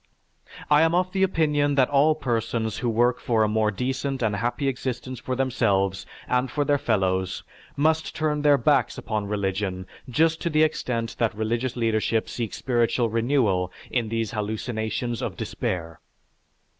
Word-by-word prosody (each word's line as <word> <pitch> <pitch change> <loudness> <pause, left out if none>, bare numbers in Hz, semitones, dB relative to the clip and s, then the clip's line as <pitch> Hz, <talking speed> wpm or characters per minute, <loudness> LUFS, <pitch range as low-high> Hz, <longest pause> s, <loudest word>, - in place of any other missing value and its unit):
I 150 +1 +6
am 165 +1 +3
of 185 +1 +1
the 190 - -1
opinion 150 -6 +2
that 135 -1 +3
all 145 +2 +4
persons 115 -5 -2
who 120 - 0
would 110 - -2
work 120 +1 +3
for 115 -2 +1
a - - +3
more 110 0 +1
decent 130 +4 -2
and 105 -2 +1
happy 120 +6 -1
existence 130 -1 -3
for 130 - -3
themselves 100 -7 0 0.2
and 125 +1 +1
for 145 -1 -1
their 145 0 +2
fellows 95 -5 0 0.3
must 160 +2 +1
turn 150 -1 0
their 145 -1 +5
backs 135 -1 +2
upon 105 -2 -3
religion 95 -2 -2 0.2
just 160 +6 +2
to 170 - 0
the 155 0 +3
extent 120 -7 -1
that 115 -3 +1
religious 115 +4 -1
leadership 115 -1 0
seeks 115 -4 -4
spiritual 120 -2 +1
renewal 115 -7 +1 0.2
in 120 -3 0
these 115 -1 -2
hallucinations 110 +2 -3
of - - -4
despair." 85 -3 -4
120 Hz, 160 wpm, -25 LUFS, 110-140 Hz, 0.3 s, I